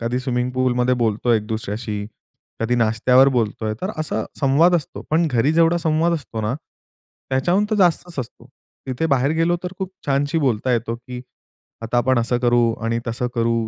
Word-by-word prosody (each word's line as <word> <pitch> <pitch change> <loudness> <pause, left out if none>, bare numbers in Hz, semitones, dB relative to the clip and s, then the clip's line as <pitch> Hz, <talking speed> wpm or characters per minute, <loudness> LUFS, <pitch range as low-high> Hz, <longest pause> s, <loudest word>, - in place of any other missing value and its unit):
कधी 120 +2 -1
स्विमिंग 125 -1 -1
पूलमध्ये 125 0 +1
बोलतो 115 +2 +1
एक 105 -2 +1
दुसऱ्याशी, 110 -1 -4 0.6
कधी 115 +2 +1
नाश्त्यावर 120 +4 +4
बोलतोय 110 -1 -1
तर 190 - -1
असा 155 - -2 0.2
संवाद 150 +6 +4
असतो. 155 - -6
पण 165 +2 +3
घरी 125 +5 +2
जेवढा 165 +1 +4
संवाद 165 +1 +1
असतो 140 -8 -5
ना, 110 +4 -1 0.8
त्याच्याहून 175 +10 +2
तर - - +2
जास्तच 175 -4 +1
असतो. 120 0 -7 0.4
तिथे 130 +5 -1
बाहेर 140 -1 +2
गेलो 170 +1 +2
तर 180 - -4
खूप 190 -1 -4 0.2
छानशी 145 +3 +1
बोलता 130 -3 0
येतो, 115 0 -1
की 125 +1 -9 0.6
आता 115 +2 -2
आपण 130 0 +2
असं 120 +1 0
करू 120 -1 +3
आणि 115 +1 0
तसं 120 +2 -2
करू 115 0 +1
125 Hz, 170 wpm, -21 LUFS, 115-155 Hz, 0.8 s, नाश्त्यावर